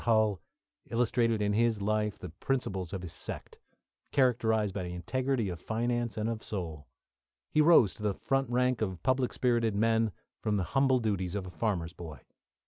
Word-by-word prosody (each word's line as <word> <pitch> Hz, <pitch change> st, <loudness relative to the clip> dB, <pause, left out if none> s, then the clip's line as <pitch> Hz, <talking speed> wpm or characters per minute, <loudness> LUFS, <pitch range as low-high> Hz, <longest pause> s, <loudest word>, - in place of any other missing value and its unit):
Hull 110 Hz, -5 st, +3 dB, 0.5 s
illustrated 115 Hz, -2 st, +1 dB
in 105 Hz, 0 st, +1 dB
his 115 Hz, 0 st, +2 dB
life 105 Hz, 0 st, 0 dB
the 90 Hz, -, -8 dB
principles 95 Hz, -4 st, -2 dB
of 95 Hz, -2 st, -5 dB
his 85 Hz, -, -5 dB
sect, -, -, -5 dB, 0.5 s
characterised 110 Hz, -6 st, +2 dB
by 95 Hz, -2 st, -3 dB
integrity 115 Hz, +8 st, -1 dB
of 85 Hz, -2 st, -6 dB
finance 120 Hz, +1 st, -1 dB
and 110 Hz, 0 st, -1 dB
of 115 Hz, -1 st, -3 dB
soul. 80 Hz, -8 st, -5 dB, 0.6 s
He 155 Hz, -, +4 dB
rose 150 Hz, -, +6 dB
to -, -, -14 dB
the 105 Hz, -2 st, 0 dB
front 135 Hz, -2 st, 0 dB
rank 125 Hz, 0 st, +1 dB
of 95 Hz, -5 st, -2 dB
public 130 Hz, +1 st, +2 dB
spirited 115 Hz, -4 st, +1 dB
men, 115 Hz, +1 st, +2 dB, 0.3 s
from 105 Hz, -1 st, 0 dB
the 95 Hz, -, 0 dB
humble 135 Hz, -1 st, +4 dB
duties 100 Hz, -6 st, -1 dB
of 100 Hz, -2 st, -3 dB
a 90 Hz, -, -8 dB
farmer's 85 Hz, -2 st, -2 dB
boy. 80 Hz, -5 st, -9 dB
110 Hz, 170 wpm, -30 LUFS, 95-120 Hz, 0.6 s, rose